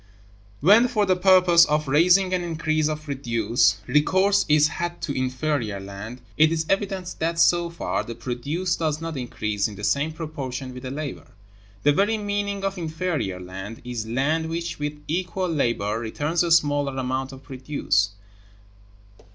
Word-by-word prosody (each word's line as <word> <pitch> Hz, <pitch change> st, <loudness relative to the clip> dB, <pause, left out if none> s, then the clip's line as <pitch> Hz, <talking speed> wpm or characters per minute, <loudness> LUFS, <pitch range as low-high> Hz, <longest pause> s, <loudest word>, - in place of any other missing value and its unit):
When, 210 Hz, -, +6 dB
for 215 Hz, -4 st, +1 dB
the 185 Hz, -1 st, +3 dB
purpose 180 Hz, -2 st, +6 dB
of 150 Hz, -1 st, 0 dB
raising 180 Hz, +6 st, +4 dB
an 180 Hz, -, +1 dB
increase 155 Hz, -2 st, 0 dB
of 155 Hz, 0 st, -4 dB
produce, 120 Hz, -6 st, +1 dB
recourse 190 Hz, -, +3 dB
is 150 Hz, 0 st, +5 dB
had 175 Hz, +1 st, -4 dB
to -, -, -2 dB
inferior 130 Hz, -4 st, -1 dB
land, 100 Hz, +5 st, -8 dB, 0.2 s
it 155 Hz, +1 st, +5 dB
is 160 Hz, -1 st, -1 dB
evident 195 Hz, -2 st, -1 dB
that, 165 Hz, +1 st, -1 dB
so 170 Hz, 0 st, +3 dB
far, 170 Hz, -, -2 dB
the 115 Hz, -, -7 dB
produce 140 Hz, +10 st, -2 dB
does 155 Hz, -2 st, -1 dB
not 165 Hz, -1 st, -5 dB
increase 105 Hz, -5 st, -2 dB
in 105 Hz, -, -9 dB
the 105 Hz, -, -10 dB
same 140 Hz, +8 st, +1 dB
proportion 140 Hz, -5 st, -6 dB
with 125 Hz, -, -8 dB
the 130 Hz, -, -6 dB
labor. 145 Hz, +1 st, -6 dB, 0.6 s
The 145 Hz, -, +5 dB
very 205 Hz, +7 st, +2 dB
meaning 205 Hz, -1 st, -2 dB
of 195 Hz, -1 st, -2 dB
inferior 160 Hz, -, -2 dB
land 95 Hz, +4 st, -8 dB
is 120 Hz, -3 st, -4 dB
land 150 Hz, +7 st, 0 dB
which 170 Hz, 0 st, -4 dB
with 150 Hz, 0 st, -4 dB
equal 185 Hz, +2 st, -2 dB
labor 115 Hz, -8 st, 0 dB
returns 145 Hz, +9 st, -1 dB
a 175 Hz, -, +1 dB
smaller 145 Hz, -4 st, +2 dB
amount 130 Hz, +1 st, -2 dB
of 135 Hz, 0 st, -12 dB
produce. 130 Hz, -6 st, 0 dB
150 Hz, 160 wpm, -24 LUFS, 125-175 Hz, 0.6 s, When